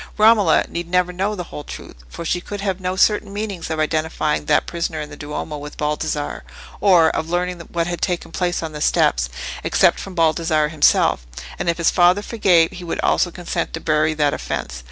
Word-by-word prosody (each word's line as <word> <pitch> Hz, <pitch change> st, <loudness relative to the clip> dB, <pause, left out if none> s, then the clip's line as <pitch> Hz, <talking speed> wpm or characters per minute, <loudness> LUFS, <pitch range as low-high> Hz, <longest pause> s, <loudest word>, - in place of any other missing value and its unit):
Romola 215 Hz, -5 st, +5 dB
need 170 Hz, 0 st, -5 dB
never 180 Hz, 0 st, +1 dB
know 195 Hz, +4 st, -1 dB
the 180 Hz, -, -4 dB
whole 150 Hz, -, -8 dB
truth, -, -, -10 dB
for 170 Hz, -, -7 dB
she 175 Hz, +2 st, 0 dB
could 205 Hz, +3 st, -7 dB
have 195 Hz, -2 st, -2 dB
no 185 Hz, 0 st, -2 dB
certain 205 Hz, +1 st, +2 dB
means 200 Hz, -5 st, -4 dB
of 160 Hz, -1 st, -2 dB
identifying 155 Hz, -1 st, 0 dB
that -, -, +2 dB
prisoner 170 Hz, -2 st, -3 dB
in 150 Hz, -1 st, -6 dB
the -, -, -8 dB
Duomo 150 Hz, 0 st, -5 dB
with 145 Hz, 0 st, -9 dB
Baldassarre, 150 Hz, 0 st, -2 dB, 0.4 s
or 175 Hz, -5 st, +5 dB
of 160 Hz, -, -3 dB
learning 180 Hz, 0 st, -1 dB
what 170 Hz, -1 st, 0 dB
had 175 Hz, 0 st, -4 dB
taken 175 Hz, -3 st, -2 dB
place 175 Hz, -1 st, -1 dB
on 160 Hz, -, -4 dB
the 150 Hz, -1 st, -7 dB
steps, 60 Hz, -, +2 dB, 0.3 s
except -, -, +3 dB
from 195 Hz, -2 st, -8 dB
Baldassarre 160 Hz, -2 st, +2 dB
himself; 145 Hz, -, +3 dB, 0.3 s
and -, -, -1 dB
if 170 Hz, -, 0 dB
his 170 Hz, -, +2 dB
father 180 Hz, +3 st, +4 dB
forgave, 180 Hz, -8 st, +3 dB
he 180 Hz, -2 st, -9 dB
would 170 Hz, -, -4 dB
also 180 Hz, -, +2 dB
consent 175 Hz, -1 st, -4 dB
to -, -, -3 dB
bury, 155 Hz, 0 st, +1 dB
that 150 Hz, -2 st, +2 dB
offence. 60 Hz, -, -4 dB
170 Hz, 200 wpm, -20 LUFS, 155-180 Hz, 0.4 s, Romola